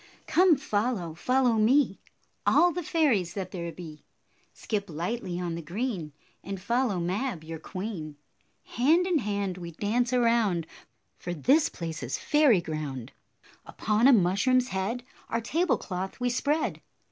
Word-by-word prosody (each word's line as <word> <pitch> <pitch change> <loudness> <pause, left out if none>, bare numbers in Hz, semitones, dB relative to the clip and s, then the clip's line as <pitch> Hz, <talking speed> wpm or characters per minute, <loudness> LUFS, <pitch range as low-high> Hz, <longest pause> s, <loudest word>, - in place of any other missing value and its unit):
Come 360 -1 +5
follow, 215 - -1
follow 250 +6 +2
me, 230 0 +3 0.5
All 350 0 +5
the 355 +2 -3
fairies 260 - +1
that 190 -2 -4
there 170 -2 -4
be. 160 -3 -10 0.5
Skip 205 -2 -4
lightly 175 +3 -3
on 175 -2 -3
the 170 - -4
green, 180 - -3 0.3
And 195 0 -5
follow 235 0 0
Mab, 185 +1 -2
your 160 0 -7
queen. 180 -4 -6 0.5
Hand 315 +9 +2
in 360 -4 +2
hand 200 -4 -2
we 170 -1 -7
dance 235 +7 0
around, 230 -8 +2 0.5
For 175 0 -4
this 275 - +3
place 165 -2 -6
is 130 +1 -3
fairy 290 - +4
ground. 150 -7 -5 0.5
Upon 215 +4 +1
a - - +8
mushroom's 240 +5 +3
head 200 +6 -2 0.3
Our 230 - 0
table 325 +10 +1
cloth 190 0 -5
we 245 0 0
spread. 290 +5 0
205 Hz, 145 wpm, -28 LUFS, 175-250 Hz, 0.5 s, a